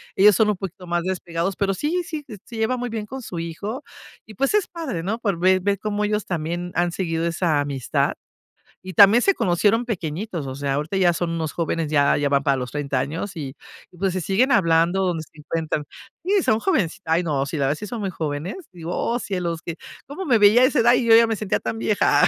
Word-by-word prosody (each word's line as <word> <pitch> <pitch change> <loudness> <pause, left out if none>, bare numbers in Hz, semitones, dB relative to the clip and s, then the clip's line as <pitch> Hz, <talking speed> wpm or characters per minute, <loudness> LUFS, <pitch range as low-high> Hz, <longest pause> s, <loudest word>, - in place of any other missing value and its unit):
Ellos 200 0 +6
son 215 +1 +3
un 210 - 0
poquito 185 -1 -7
más 175 0 0
despegados, 180 0 -2
pero 195 -1 0
sí, 315 - -1
sí, 310 -3 -6
s 215 -5 -9
se 235 - -10
lleva 220 +3 +1
muy 245 0 -3
bien 220 -2 -4
con 265 +4 -7
su 180 -7 -6
hijo 200 - -5 0.4
y 220 - -12
pues, 275 - 0
es 420 -3 +2
padre, 290 - -5
no 215 +6 -2
pues 200 -7 -1
ver 185 +1 +4
ver 200 0 0
cómo 210 0 -2
ellos 210 0 0
también 175 +1 -3
han 175 0 +1
seguido 165 -2 -2
esa 170 -3 +1
amistad 140 -4 -1 0.7
y 185 0 -7
también 200 +7 +7
se 395 - +4
conocieron 205 - +2
pequeñitos. 175 - -4
O 130 - -5
sea, 140 0 -1
ahorita 150 +6 -3
ya 180 -2 +4
son 170 0 -2
unos 160 -2 -3
jóvenes, 165 -2 -1
ya 145 -2 +3
ya 145 -1 +1
van 140 0 +2
para 140 -1 +2
los 125 -1 -4
30, 145 -3 -1
años 165 +8 -4
y 140 -3 -6 0.4
pues 190 0 0
se 185 - -2
siguen 205 - +2
hablando 170 0 +3
donde 170 -3 -1
se - - -19
encuentran. 155 -1 -3 0.4
Sí, 390 0 +2
son 220 - +2
jovencit 195 - 0
ay, 165 +2 +2
no, 145 -4 0
la 160 - -3
verdad 140 +2 +1
si 210 +6 -7
son 235 +1 -5
muy 195 -2 -2
jóvenes, 155 - -4
digo, 175 -1 -6
oh, 235 - 0
cielos 175 -6 -3
que 170 - -5 0.3
cómo 295 +8 -6
me 245 -6 +4
veía 210 +4 +6
a - - +7
esa 260 +1 +2
edad 235 +1 +5
y 250 - +2
yo 225 -1 +7
ya 230 0 +7
me 225 - 0
sentía 210 -2 -1
tan 115 -1 -4
vieja. 115 - +3
180 Hz, 235 wpm, -23 LUFS, 165-220 Hz, 0.7 s, también